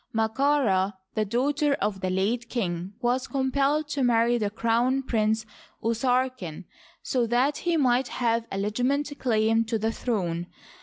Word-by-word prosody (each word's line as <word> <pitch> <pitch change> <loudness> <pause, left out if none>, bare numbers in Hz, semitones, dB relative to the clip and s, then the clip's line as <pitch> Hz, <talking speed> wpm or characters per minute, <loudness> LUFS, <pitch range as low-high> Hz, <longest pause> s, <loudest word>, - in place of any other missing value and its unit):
Md^kaRd, 220 -4 +2 0.2
the 215 - 0
daughter 280 +6 +1
of 200 -5 -2
the 185 - -1
late 220 +6 -1
king, 180 -5 -3
was 250 +2 0
compelled 280 +3 +1
to 290 -1 -2
marry 240 -1 +3
the 210 -2 0
crown 235 +5 +1
prince 220 -3 0 0.4
Usarken, 235 - -1 0.4
so 245 -3 0
that 250 +5 +2
he 345 -1 0
might 255 -2 +2
have 230 -1 0
a 195 - -3
legitimate 250 +9 0
claim 225 -2 +2
to 225 0 -1
the 220 +1 0
throne. 175 -8 -2
235 Hz, 145 wpm, -26 LUFS, 215-260 Hz, 0.4 s, marry